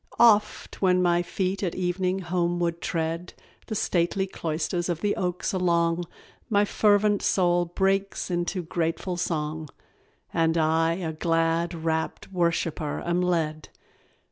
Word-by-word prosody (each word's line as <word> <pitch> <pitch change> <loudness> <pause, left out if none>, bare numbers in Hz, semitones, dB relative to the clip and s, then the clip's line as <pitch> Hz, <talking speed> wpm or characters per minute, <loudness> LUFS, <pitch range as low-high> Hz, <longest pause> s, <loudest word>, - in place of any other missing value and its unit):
Oft, 215 -2 +3
when 185 -1 +4
my 175 -1 +3
feet 185 +2 -2
at 180 -4 -2
evening 185 +1 0
homeward 175 -1 -1
tread 165 +1 -3 0.3
The 220 - -3
stately 180 0 +1
cloisters 170 0 -2
of 170 -1 -2
the 205 - +1
oaks 180 +1 -2
along, 170 -2 +1 0.4
My 205 -2 +3
fervent 205 0 +3
soul 175 -2 +2
breaks 195 +2 0
into 175 +1 -1
grateful 165 +2 -2
song, 155 -3 -3 0.6
And 165 0 +2
I 165 +1 +2
a 165 -2 -3
glad, 165 +1 0
rapt 160 +3 -3
worshipper 165 -4 -1
am 175 +1 +1
led. 160 -4 -1
175 Hz, 125 wpm, -26 LUFS, 165-185 Hz, 0.6 s, when